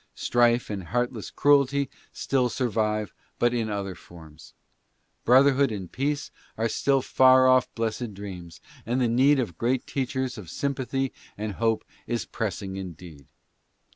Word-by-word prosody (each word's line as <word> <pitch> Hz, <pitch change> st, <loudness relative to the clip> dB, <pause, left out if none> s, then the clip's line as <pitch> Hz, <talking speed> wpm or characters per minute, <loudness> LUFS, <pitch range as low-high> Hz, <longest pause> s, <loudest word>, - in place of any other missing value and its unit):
St:::~e 120 Hz, 0 st, +3 dB
and 95 Hz, -3 st, -5 dB
heartless 120 Hz, +3 st, -2 dB
cruelty 140 Hz, -1 st, +3 dB, 0.2 s
still 130 Hz, -2 st, 0 dB
survive, 110 Hz, -4 st, -1 dB, 0.2 s
but 120 Hz, 0 st, +2 dB
in 115 Hz, -2 st, -1 dB
other 100 Hz, -2 st, -3 dB
forms. 80 Hz, -3 st, -15 dB, 0.7 s
Brotherhood 135 Hz, +1 st, +5 dB
and 95 Hz, -5 st, -6 dB
peace 145 Hz, +2 st, -2 dB, 0.3 s
are 115 Hz, +1 st, +1 dB
still 135 Hz, +3 st, +1 dB
far 130 Hz, 0 st, +5 dB
off 130 Hz, -1 st, +4 dB
blessed 115 Hz, -1 st, -3 dB
dreams, 90 Hz, -4 st, -9 dB, 0.2 s
and 120 Hz, +3 st, -1 dB
the 125 Hz, -, +2 dB
need 135 Hz, +5 st, +4 dB
of 110 Hz, -11 st, -3 dB
great 125 Hz, +2 st, 0 dB
teachers 130 Hz, -2 st, -3 dB
of 90 Hz, -6 st, -10 dB
sym 140 Hz, 0 st, -1 dB
pathy 135 Hz, +1 st, -2 dB, 0.3 s
and 105 Hz, +1 st, -3 dB
hope 115 Hz, +2 st, 0 dB, 0.2 s
is 120 Hz, 0 st, -2 dB
pressing 100 Hz, -3 st, -4 dB
indeed. 85 Hz, -6 st, -9 dB
120 Hz, 140 wpm, -26 LUFS, 100-130 Hz, 0.7 s, Brotherhood